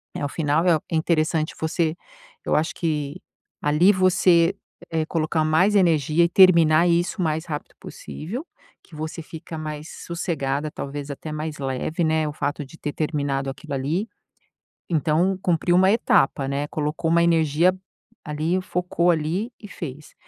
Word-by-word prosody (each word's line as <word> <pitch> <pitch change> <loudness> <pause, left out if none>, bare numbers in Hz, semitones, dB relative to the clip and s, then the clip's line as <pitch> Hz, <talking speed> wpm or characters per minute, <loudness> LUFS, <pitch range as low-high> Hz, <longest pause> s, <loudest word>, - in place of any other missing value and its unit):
é - - -4
o - - -3
final, 155 +2 0
é 170 -3 +5
o - - -13
Interessante 160 -1 +1
você 160 0 0 0.5
eu - - +1
acho 155 +2 +1
que 150 -4 -2 0.4
ali, 150 +7 +4
você, 185 -1 +4 0.4
eh, 160 -1 0
colocar 160 -1 0
mais 180 +7 +3
energia 165 -4 +3
e - - 0
terminar 170 -3 +6
isso 170 +3 +1
o - - +1
mais 160 0 -1
rápido 150 -3 -6
possível, 230 - -7 0.4
que 160 - -15
você 155 +2 -5
fica 160 +1 -9
mais 155 0 -6 0.2
sossegada, 155 -4 -2
talvez 140 0 -6
até 155 +2 -7
mais 155 0 -4
leve, 135 +5 -2
né, 160 -1 +1
o 150 - -4
fato 145 0 -3
de 150 +5 -15
ter 145 - -4
terminado 140 -3 -1
aquilo 140 +2 -7
ali. 150 +10 -1 0.8
Então, 170 +4 +1
cumpriu 175 0 +2
uma 190 +1 +5
etapa, 140 - +2
né, 140 +1 -1
colocou 155 +2 -2
uma 170 +1 +4
energia 165 +1 +3 0.5
ali, 160 +4 -1
focou 180 -1 0
ali, 170 +8 -1
e 210 - -9
fez. 150 -5 -8
160 Hz, 155 wpm, -23 LUFS, 150-170 Hz, 0.8 s, terminar